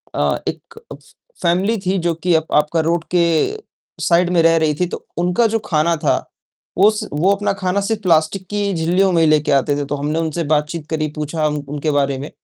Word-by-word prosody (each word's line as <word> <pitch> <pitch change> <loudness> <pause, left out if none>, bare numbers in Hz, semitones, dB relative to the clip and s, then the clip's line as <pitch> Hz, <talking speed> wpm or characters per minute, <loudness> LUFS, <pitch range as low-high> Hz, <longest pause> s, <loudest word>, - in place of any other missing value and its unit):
अ, - - +1
एक - - -3 0.3
फ़ - - -12 0.4
फ़ैमिली 190 +6 +1
थी 190 +1 +1
जो 170 - +2
कि 180 -2 +2
आप 160 0 +1
आपका 150 +2 +2
रोड 170 -1 0
के 170 - +4 0.8
साइड 175 0 +3
में 175 -2 +3
रह 165 0 +4
रही 155 -2 +1
थी, 180 - +2
तो - - -8
उनका 180 +6 +1
जो 225 +1 -1
ख़ाना 165 +1 +2
था - - +1 0.6
वो 200 +3 +6
स 215 - -5
वो 175 +7 +2
अपना 205 +1 -1
ख़ाना 195 +1 -1
सिर्फ़ 215 +1 -2
प्लास्टिक 170 +1 +1
की 205 -1 -1
झिल्लियों 180 +4 +1
में 170 -2 +2
ही 160 - +4
लेके 150 -1 +2
आते 140 +1 +2
थे। 145 - -2
तो 145 - -3
हमने 150 +3 -2
उनसे 165 +1 -2
बातचीत 150 +1 -1
करी, 155 -1 -1
पूछा 155 +1 -1
उन 150 - -2
उनके 150 +1 -2
बारे 140 -1 0
में, 140 +3 -7
165 Hz, 215 wpm, -18 LUFS, 150-185 Hz, 0.8 s, वो